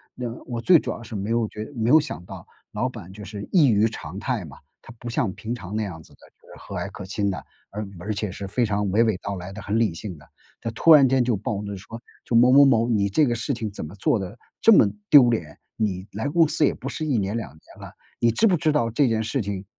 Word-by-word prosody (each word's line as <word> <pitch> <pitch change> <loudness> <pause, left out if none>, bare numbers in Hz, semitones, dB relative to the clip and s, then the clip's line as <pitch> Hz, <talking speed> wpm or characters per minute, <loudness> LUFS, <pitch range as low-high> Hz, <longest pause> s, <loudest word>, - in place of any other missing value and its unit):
那 125 -1 -4 0.2
我 120 -2 -4
最 170 +6 +6
主 - - -4
要 - - -7
是 115 -1 -9
没 100 +2 -3
有 115 -1 +1
觉 105 0 -7
没 115 -1 0
有 155 +4 +7
想 90 - -5
到 - - -10 0.3
老 - - -1
板 90 - -10
就 105 +2 -10
是 100 0 -7
异 160 -8 +5
于 110 0 +3
常 95 -5 -7
态 120 -5 -2
嘛， 70 - -12 0.3
他 115 - -12
不 120 - -6
像 115 -4 0
平 110 +4 -5
常 100 -3 -8
那 110 - 0
样 90 -6 -7
子 - - -19
的， - - -22 0.2
就 - - -25
是 - - -14
和 - - -8
蔼 - - -4
可 100 - -8
亲 100 +1 -1
的， 95 - -6 0.3
而 105 +1 -5
而 105 +5 -3
且 105 -1 -3
是 100 +1 -7
非 120 +5 0
常 105 -1 -1
娓 105 +5 +3
娓 110 -5 +1
道 100 - -4
来 90 +1 -8
的， 105 +3 -8
很 105 +3 0
理 110 -7 +1
性 95 +1 -6
的， 75 - -18 0.3
他 115 - -3
突 160 +9 +5
然 140 -3 +7
间 130 -1 +3
就 120 -2 +1
暴 105 +1 -3
怒 100 0 -5
说： 110 +4 -9 0.2
“就 115 - -2
某 120 +2 +6
某 140 +2 +8
某， 115 -4 +3
你 100 -3 +1
这 150 +10 +3
个 120 - 0
事 115 +4 -2
情 115 -4 -4
怎 100 - -7
么 80 +6 -10
做 105 +2 +1
的 95 +4 -7 0.2
这 225 - +6
么 205 - +7 0.2
丢 135 -5 +8
脸？ 85 -11 -3 0.2
你 95 -4 -2
来 110 +8 -3
公 165 +1 +4
司 150 - +1
也 - - +2
不 - - -8
是 - - -4
1 140 -6 +1
年、 100 +1 -1
2 115 - -4
年 80 - -19 0.2
了， - - -9 0.3
你 115 - +3
知 170 - +2
不 195 -5 +4
知 160 -1 +1
道 145 -6 +1
这 135 +4 +2
件 110 -2 0
事 130 +4 -1
情 100 -1 -5
110 Hz, 295 characters per minute, -24 LUFS, 100-125 Hz, 0.3 s, 某